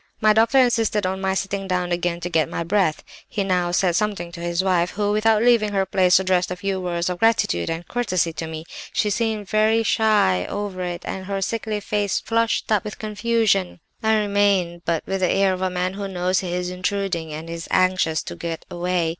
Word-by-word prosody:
"My 215 0 +5
doctor 225 +4 +3
insisted 225 -5 +3
on 190 +1 -2
my 190 0 0
sitting 195 0 -2
down 180 -1 -1
again 175 0 -1
to 175 - -3
get 160 -4 +2
my - - -3
breath. 175 -3 +1 0.3
He 205 - -1
now 180 -2 +1
said 180 -1 +1
something 200 -4 -1
to 170 - -9
his 170 +1 -1
wife 180 -2 +2
who, 205 0 -1
without 215 +1 +3
leaving 230 -4 +3
her 195 -1 +1
place, 185 -1 +4
addressed 185 -1 +1
a 180 - -3
few 190 0 -2
words 175 -1 -2
of 180 -1 -3
gratitude 225 - +2
and 165 +1 -4
courtesy 185 -9 0
to 165 - -5
me. 160 0 -7 0.3
She 210 - +1
seemed 220 -1 -1
very 220 +2 +3
shy 210 - +2
over 200 -2 -4
it, 175 -1 -4
and 190 0 -5
her 200 -1 -2
sickly 215 +1 -2
face 205 -1 -1
flushed 230 -1 0
up 210 -2 +3
with 210 -2 -7
confusion. 215 -3 0 0.2
I 220 0 +3
remained, 200 -4 +1
but 165 -2 0
with 195 0 -2
the 185 -2 +2
air 195 -1 +3
of 185 - -5
a 185 - +1
man 180 +1 -2
who 200 0 -4
knows 185 0 0
he 180 -2 -4
is 180 0 -2
intruding 180 -3 -2
and 155 +2 -6
is 165 0 -6
anxious 185 -4 +2
to - - -7
get 165 -1 -5
away. 175 -1 0
190 Hz, 215 wpm, -22 LUFS, 175-210 Hz, 0.3 s, My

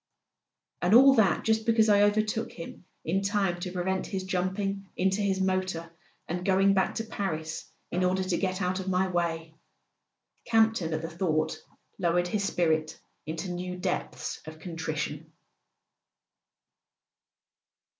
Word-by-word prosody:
"And 180 +5 +4
all 270 +2 +9
that 220 -6 +3
just 220 0 +2
because 225 -1 +4
I 205 -1 +5
overtook 215 +2 +1
him 170 +1 -9 0.2
in 185 +5 +1
time 195 -3 0
to 180 +1 -4
prevent 190 +1 -1
his 190 -2 -3
jumping 195 +2 -2
into 190 +2 +1
his 195 -2 +1
motor 185 -3 -1 0.4
and 180 +2 -3
going 195 +1 +4
back 190 -1 +1
to 225 - -2
Paris 160 -8 -4 0.2
in 180 +1 0
order 185 +1 +2
to 185 -2 0
get 185 0 -1
out 185 +1 0
of 190 - -6
my 190 +1 +2
way!" 165 -3 -2 0.9
Campton, 220 -8 +2
at 155 - -4
the - - -2
thought, 160 -2 -1 0.4
lowered 175 0 +1
his 205 +2 0
spirit 160 -4 0 0.3
into 165 +4 -4
new 180 +1 -4
depths 180 0 -3
of 155 0 -8
con¬ 165 +1 -8
trition. 155 -1 -3
185 Hz, 145 wpm, -28 LUFS, 170-195 Hz, 0.9 s, all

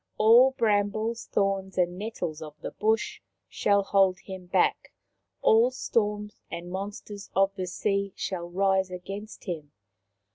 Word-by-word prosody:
All 245 +5 +6
brambles, 215 +1 +1
thorns 195 -1 0
and 175 -1 +2
nettles 180 -7 -4
of 150 -1 -9
the - - -6
bush 225 - 0 0.3
shall 200 -1 +2
hold 195 -1 +3
him 190 -2 -9
back; - - +1 0.5
all 225 +3 +6
storms 210 -4 -2
and 175 +1 -6
monsters 200 +1 -6
of 195 +1 +3
the 185 -2 -4
sea 200 +2 -1
shall 175 -2 -4
rise 190 +1 +2
against 195 +4 -7
him. 155 -6 -6
195 Hz, 135 wpm, -27 LUFS, 185-215 Hz, 0.5 s, All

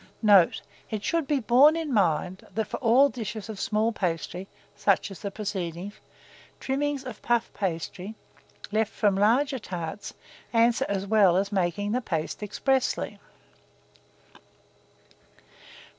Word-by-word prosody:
Note. 200 -5 +5 0.3
It 215 -2 -4
should 330 +4 0
be 290 -1 +1
borne 260 +6 +5
in 320 -4 -3
mind, 185 -2 0
that, 220 0 0
for - - -5
all 255 +3 +5
dishes 220 -3 -6
of 210 -3 -6
small 215 +3 +1
pastry, 180 -1 -3 0.3
such 200 0 +1
as 195 - -9
the 200 - -4
preceding, 195 -2 -4 0.7
trimmings 280 +1 -1
of 250 -5 -8
puff 235 -1 0
pasty, 185 +2 -4 0.6
left 220 0 +1
from 205 -3 +1
larger 250 +7 +2
tarts, 180 -1 -6 0.4
answer 235 +3 +3
as 195 -1 -1
well 200 -4 +4
as 195 +2 0
making 195 +1 0
the 250 +3 0
paste 165 -6 -3
expressly. 260 +6 -1
210 Hz, 130 wpm, -26 LUFS, 190-240 Hz, 0.7 s, Note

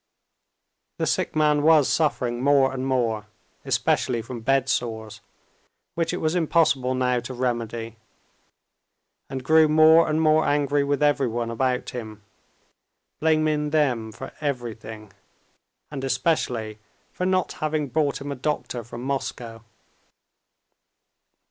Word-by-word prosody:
The - - -1
sick - - -1
man 150 -1 +3
was 155 -2 +5
suffering 125 -6 0
more 135 -1 +3
and 130 0 -3
more, 115 -5 -1 0.4
especially 120 -3 0
from 120 -1 -7
bedsores, 120 -4 -1 0.7
which 165 -1 -1
it - - -3
was 155 0 -1
impossible 155 -7 +2
now 125 -1 +1
to 120 +2 -7
remedy, 115 -2 -3 1.3
and 130 -1 -5
grew 160 +3 +5
more 160 +2 +6
and 155 +1 +1
more 155 0 +4
angry 145 0 +1
with 145 +1 0
everyone 120 -5 +1
about 125 +1 -1
him, 110 -4 -8 1.0
blaming 155 -1 +1
them 130 -8 0
for - - -9
everything, 110 -7 -5 0.8
and 135 -3 -5
especially 125 -5 -1 0.3
for 180 - -2
not 185 -1 +1
having 155 -1 -1
brought 145 0 0
him 140 +1 -5
a - - -3
doctor 130 -3 -3
from 120 +1 -9
Moscow. 120 -4 -4
135 Hz, 120 wpm, -24 LUFS, 120-150 Hz, 1.3 s, more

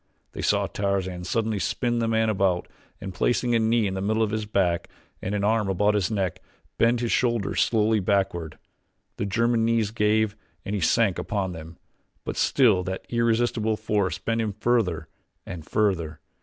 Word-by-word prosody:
They - - -6
saw - - +2
Tarzan 95 -3 -2
suddenly 110 +1 -1
spin 120 +8 -1
the 115 - 0
man 110 0 +2
about 95 -4 +1 0.3
and 95 - -6
placing 120 +5 +1
a 115 - +4
knee 110 0 +2
in 95 - -1
the 95 - -3
middle 110 +3 +1
of 105 - -1
his 110 -1 -2
back 90 -5 0 0.3
and 100 - -2
an 100 - -1
arm 105 -1 +1
about 105 +3 +2
his 105 -2 +1
neck 95 -6 -2 0.4
bend 115 +1 +3
his 120 - -1
shoulders 120 -5 +1
slowly 110 -1 +2
backward. 90 -5 -1 0.6
The 100 - -2
German's 115 +2 +1
knees 115 -2 +1
gave 110 -1 +1 0.3
and 100 - -3
he 100 - -1
sank 100 +3 +2
upon 100 -3 -2
them, 80 0 -9 0.5
but - - -4
still 110 -9 +3
that 95 0 -4
irresistible 115 -2 +1
force 100 -5 -1
bent 115 +4 -1
him 110 -2 -2
further 95 -8 0 0.4
and 90 -4 -7
further. 85 -8 0
105 Hz, 175 wpm, -25 LUFS, 95-115 Hz, 0.6 s, a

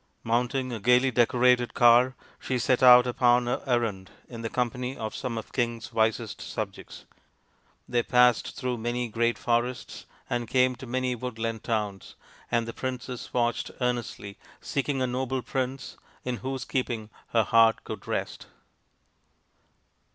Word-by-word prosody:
Mount 120 +3 0
ing 130 -2 -2
a 115 - -4
gaily 125 +4 +4
decorated 125 +1 +3
car, 120 +2 +5 0.2
she 130 - -2
set 125 +1 +1
out 125 -1 +9
upon 125 0 +3
her 120 - -1
errand 110 -7 -1 0.2
in 115 -2 -8
the 115 - -3
company 125 +2 -2
of 110 -1 -4
some 120 -3 -4
of 110 - -4
the - - -25
king's 120 -2 -2
wisest 110 -1 0
subjects. - - -6 0.8
They 120 -1 +1
passed 125 -1 +3
through 125 -3 -2
many 120 +1 -2
great 115 +1 0
forests 120 +1 -2 0.2
and 120 -1 -2
came 125 +1 +2
to 130 0 -9
many 130 +1 -1
woodland 115 -2 -4
towns; 105 -4 -3 0.3
and 115 -1 0
the 115 - -5
princess 125 -1 -5
watched 120 -1 0
earnestly, 120 -5 -3 0.2
seeking 140 -1 -2
a - - +2
noble 130 0 -2
prince 130 0 -4 0.3
in 125 -1 -3
whose 130 0 -4
keeping 115 -5 -3 0.2
her 115 -1 +2
heart 115 0 +4
could - - -8
rest. - - -4
120 Hz, 150 wpm, -27 LUFS, 115-125 Hz, 0.8 s, out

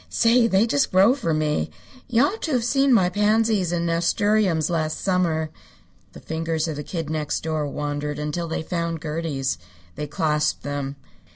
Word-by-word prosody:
Say, 235 0 +4
they 195 0 +3
just 145 -11 +1
grow 195 +6 +6
for 260 -12 -2
me. 150 - 0 0.4
You 245 +1 +3
ought 390 +10 -1
to 315 - -2
have 245 -2 +1
seen 270 +3 +2
my 195 -7 +5
pansies 210 -1 +2
and 170 -1 0
nasturtiums 170 0 +2
last 155 -2 -1
summer." 170 -5 0 0.6
The - - -10
fingers 160 0 -2
of 160 - -3
the 150 - -4
Kid 165 0 -4
Next 155 -1 -2
Door 155 -2 -1
wandered 145 0 -3
until 150 +3 -3
they 160 - -3
found 170 -1 -2
Gertie's. 150 - -2 0.3
They 150 +1 -5
clasped 150 -1 0
them. 145 -1 -3
165 Hz, 170 wpm, -23 LUFS, 150-205 Hz, 0.6 s, grow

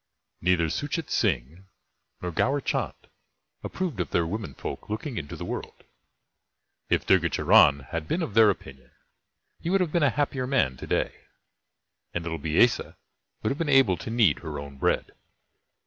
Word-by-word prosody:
Neither 85 -2 +2
Suchet 145 +2 -3
Singh 85 +10 -1 0.6
nor 90 - -2
Gaur 135 - +1
Chand - - -2 0.7
approved 175 - -3
of 90 - -1
their 85 - +1
women 95 - -5
folk - - -7
looking 115 +5 -4
into 70 -3 -7
the - - -6
world. - - -6 1.1
If - - +1
Durga 90 -3 +4
Charan 70 -1 +5
had 80 +4 -5
been 170 - 0
of 120 - -4
their 110 -1 +7
opinion, 65 -9 -6 0.7
he 170 - -4
would 195 +2 +3
have 180 -4 0
been 170 - +1
a 145 - +5
happier 135 -1 -1
man 125 - +2
to - - -8
day, - - -1 1.0
and 85 - -1
little 80 -1 -4
Biessa 80 +11 +2 0.5
would - - +1
have 140 - -4
been 165 -3 -1
able 135 -9 +5
to 85 - -7
knead 110 -9 +3
her 80 -3 -6
own 70 -1 -9
bread. - - 0
95 Hz, 165 wpm, -26 LUFS, -, 1.1 s, their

